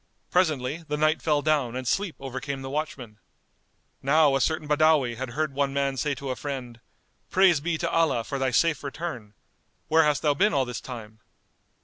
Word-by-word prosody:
Presently, 155 -3 +1
the 150 - -2
night 155 +1 +2
fell 150 -2 +1
down 145 -6 +1
and 130 -1 -4
sleep 195 +4 0
overcame 135 +1 -5
the 135 - -6
watchmen. 130 -7 -5 0.8
Now 145 0 +4
a 135 - +1
certain 160 -1 0
Badawi 150 -5 +3
had 130 +2 -5
heard 150 +3 -2
one 140 0 0
man 140 -1 0
say 140 +2 -1
to 135 -1 -5
a - - -2
friend, 125 -5 -6 0.5
"Praise 185 -4 +4
be 165 +2 -1
to 170 - -2
Allah 160 -8 +2
for 140 +3 -4
thy 135 -1 +1
safe 150 +4 +2
return! 135 -8 -6 0.5
Where 160 +1 +5
hast 150 -2 +1
thou 150 -2 +3
been 195 +5 +2
all 135 -2 +2
this 125 -1 -5
time?" 110 -4 -9
140 Hz, 190 wpm, -26 LUFS, 130-155 Hz, 0.8 s, Where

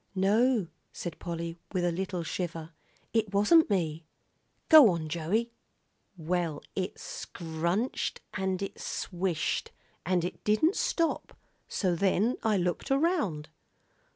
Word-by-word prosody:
"No," 215 +3 +3 0.3
said 175 -3 -6
Polly, 170 -1 -5
with 180 -2 +1
a 175 - +2
little 185 0 -3
shiver, 165 -1 -4 0.4
"it 220 -3 +1
wasn't 210 +12 +5
me. 165 -5 -1 0.6
Go 310 -8 +10
on, 165 -3 -2
Joey." 180 +9 -1 0.7
"Well, 165 -2 -2
it 185 -1 -3
scrunched 170 +8 -3
an' 190 -1 -1
it 195 - -5
swished, 175 -2 -2 0.3
and 175 -1 +1
it 180 - -6
didn't 265 - +3
stop, 335 -1 -1 0.3
so 185 -4 0
then 200 +6 +2
I 215 -2 +2
looked 180 -1 -1
around." 270 - +1
185 Hz, 120 wpm, -29 LUFS, 170-215 Hz, 0.7 s, Go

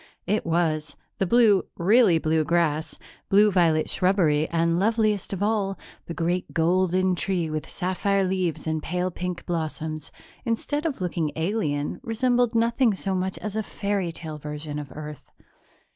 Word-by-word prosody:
It 210 -1 0
was. 155 -3 0 0.2
The 195 - +1
blue 220 -3 +5
really 200 0 +5
blue 160 0 +1
grass, 160 -1 0 0.3
blue 205 +1 +5
violet 165 -4 +3
shrubbery 170 -5 +2
and, 170 0 +1
loveliest 215 -1 +1
of 195 0 -2
all, 205 -3 0 0.3
the 170 - -5
great 175 +2 -1
golden 185 +2 +2
tree 175 -2 -1
with 155 -1 -4
sapphire 195 +2 0
leaves 185 -3 -1
and 160 -1 -1
pale 180 +3 -2
pink 180 0 -5
blossoms, 155 -2 -4 0.3
instead 290 +6 -1
of 280 -10 -4
looking 170 -4 -1
alien, 160 -5 -1
resembled 245 +1 +1
nothing 230 -1 +3
so 190 0 -3
much 185 0 -2
as 210 -1 -5
a 220 - +1
fairy 200 -4 -2
tale 160 -2 -7
version 150 0 -5
of 145 -2 -8
Earth. 150 -1 -8
180 Hz, 150 wpm, -25 LUFS, 160-205 Hz, 0.3 s, blue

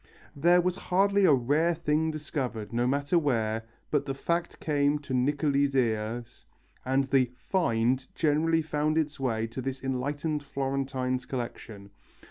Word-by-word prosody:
There 175 +5 +4
was 180 +1 -1
hardly 200 +2 +4
a - - +6
rare 145 +6 +2
thing 160 0 0
discovered, 130 -9 -4
no 120 +1 +1
matter 140 +6 +2
where, 115 -6 0 0.3
but 145 - +1
the 135 - -2
fact 170 +4 -2
came 145 -1 +1
to 140 -2 -7
Niccoli's 140 +1 +1
ears, 115 -1 -1 0.4
and 135 +1 +2
the 130 -2 +2
"find" 130 -6 0
generally 160 +1 +2
found 150 0 0
its 155 -2 -1
way 115 -4 0
to 115 +3 -6
this 135 +1 -4
enlightened 145 +4 -2
Florentine's 135 -2 -2
collection. 110 -5 -6
140 Hz, 140 wpm, -28 LUFS, 125-155 Hz, 0.4 s, a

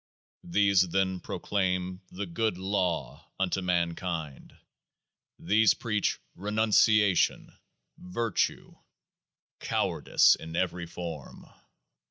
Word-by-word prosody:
These 100 0 +3
then 95 0 0
proclaim 90 -1 -2
" - - -35
The 100 +3 -5
Good 100 +3 -1
Law 90 -8 -2
" - - -44
unto 95 0 0
mankind. 85 -4 -3 0.8
These 105 +4 +3
preach 105 -4 -1 0.2
renunciation, 105 0 +2 0.2
" - - -53
virtue 100 +4 -2 0.4
", - - -67
cowardice - - +3
in 80 0 -6
every 90 -1 -2
form. 80 -4 -8
95 Hz, 100 wpm, -28 LUFS, 85-100 Hz, 0.8 s, These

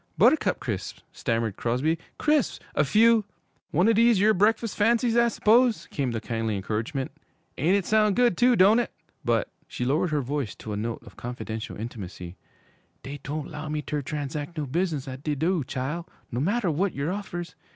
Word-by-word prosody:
'Buttercup - - +4
Crisps!' - - -5
stammered 115 -3 -1
Crosby. 135 +8 0 0.2
'Crisps! 300 -4 +1
A - - +3
few 220 +8 +5 0.2
' - - -44
'One 175 +7 +3
o' 230 - +5
dese 230 0 +5
yere 210 +3 +4
breakfus' 215 +3 +2
fancies, 230 +2 +2
I 235 0 +5
s'pose?' 235 +1 +3
came 140 -4 -1
the 115 -1 -2
kindly 115 -1 -2
encouragement. 110 +7 -3 0.4
'An' 170 +8 +2
it 200 -3 0
soun' 215 -2 +3
good, 245 -6 +3
too, 245 +5 +4
doan't 210 +4 +6
it? 240 - -1 0.3
But' 115 -2 +1 0.2
she 125 - -4
lowered 150 +7 +1
her 150 -2 0
voice 135 -2 -3
to 110 - -7
a - - -2
note 115 +3 -4
of 115 - -14
confidential 115 -2 -5
intimacy 95 -6 -7 0.7
'dey 140 +3 -7
doan't 150 +1 -4
'low 150 +1 -6
me 150 0 -2
ter 150 0 -2
transac' 150 +3 -4
no 150 - -1
business 155 -1 -1
at 130 0 -7
de 150 0 -1
do', 165 +2 +1
chile, 140 +7 -3 0.3
no 120 - -2
matter 200 - +1
w'at 180 +5 0
yer 140 +5 -1
offers. 175 -4 -5
150 Hz, 185 wpm, -26 LUFS, 125-205 Hz, 0.7 s, doan't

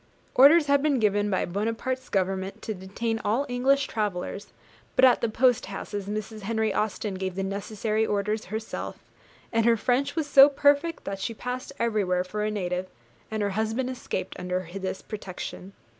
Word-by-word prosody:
Orders 295 +5 +7
had 280 -1 +3
been 290 -2 +2
given 205 -2 +2
by 190 - +1
Buonaparte's 230 +7 -2
government 195 +1 -1
to 220 - -3
detain 220 +4 -3
all 230 +7 +1
English 265 +3 +2
travellers, 205 -1 -3 0.5
but 260 - +7
at 250 - +5
the 235 - +1
post 250 +2 +2
houses 200 0 -5
Mrs. 215 +1 -4
Henry 220 +1 0
Austen 210 -1 -1
gave 190 -1 -3
the 195 - -2
necessary 210 +2 -1
orders 210 0 -1
herself, 220 +3 -5 0.6
and 225 0 +3
her 235 -1 +5
French 250 +5 +1
was 320 -2 0
so 280 -1 +8
perfect 285 +3 +2
that 195 -1 -4
she 225 +4 -3
passed 250 +3 -5
everywhere 200 -6 +1
for 210 +3 -4
a 215 - 0
native, 185 -3 -2 0.4
and 220 -1 -2
her 200 - 0
husband 220 +5 -1
escaped 240 -6 -4
under 180 0 -2
this 190 -1 -4
protection. 195 -2 -7
215 Hz, 170 wpm, -26 LUFS, 195-245 Hz, 0.6 s, so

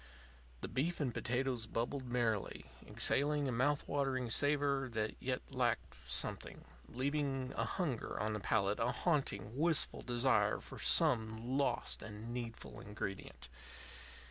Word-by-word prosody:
The - - -3
beef 165 +7 -1
and 135 -6 0
potatoes 125 -1 -1
bubbled 125 +4 -2
merrily, 120 -4 0 0.2
exhaling 145 0 +2
a - - 0
mouth 135 +5 +1
watering 135 -4 0
savor 140 -1 +3
that 110 -1 0
yet 130 +1 -3
lacked 120 - 0
something, - - -2 0.2
leaving 135 0 -1
a - - 0
hunger 150 - -2
on 110 +1 0
the 105 - -2
palate, 100 0 +1
a 115 - +2
haunting, 135 - 0
wistful 160 +2 +2
desire 125 +2 +2
for - - -10
some 120 -5 +2
lost 135 -4 +1
and 110 +2 -7
needful 115 - -6
ingredient. 100 - -6
125 Hz, 130 wpm, -36 LUFS, 110-140 Hz, 0.2 s, savor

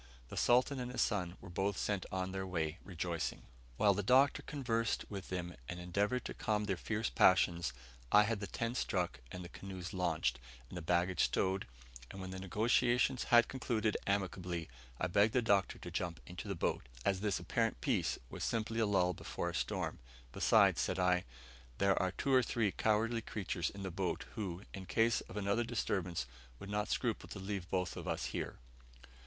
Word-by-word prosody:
The - - -7
Sultan 125 +3 +3
and 125 0 -3
his 125 - +2
son 90 -4 -1
were 95 - -10
both 95 +2 0
sent 100 -2 -1
on 95 0 -2
their 95 0 -3
way 85 -2 -2
rejoicing. 85 -3 -3 0.3
While 100 -1 +5
the 100 - -1
Doctor 130 +7 +5
conversed 115 -6 -1
with 100 -3 -6
them, 90 -1 -3 0.2
and 90 - -4
endeavoured 100 +8 0
to - - -4
calm 105 -2 0
their 100 -2 0
fierce 110 +4 -2
passions, 85 -4 +4 0.4
I 105 - +8
had 110 0 0
the 105 - -4
tent 115 +4 -2
struck, 90 -9 -1
and 90 0 -6
the - - -8
canoes 95 -2 -7
launched, 80 -9 0 0.3
and - - -7
the 90 - -4
baggage 90 +2 +2
stowed, 95 +1 0 0.4
and 95 - -8
when 95 0 -5
the 95 - -5
negotiations 120 +6 +2
had 120 -1 +6
concluded 115 -5 0
amicably, 90 -4 -1 0.3
I - - +1
begged 105 +4 +3
the 125 - +4
Doctor 100 -4 +2
to - - -8
jump 85 -2 -2
into 90 0 -7
the - - -2
boat, - - 0 0.2
as 95 -1 +2
this 105 -3 +1
apparent - - 0
peace - - +1
was - - -6
simply 115 0 -1
a 110 - +3
lull 90 -3 +3
before - - -3
a - - -12
storm; - - -2 0.3
besides, - - +4
said - - 0
I, 90 -1 +3 0.5
there 100 -1 +4
are 95 -1 +1
two 135 +7 -1
or 130 - +7
three 115 -4 +1
cowardly 115 +3 +1
creatures 95 -5 -2
in 100 -1 -8
the 95 - -3
boat, - - -2
who, 95 -3 -4
in 95 -2 -7
case 115 +4 +3
of 100 - -9
another 100 +3 +1
disturbance, 95 - -1 0.3
would 100 - -8
not 105 0 0
scruple 120 -4 -1
to - - -6
leave 95 -2 -4
both 90 -1 -1
of - - -6
us - - -1
here. - - -4
100 Hz, 190 wpm, -35 LUFS, 90-110 Hz, 0.5 s, I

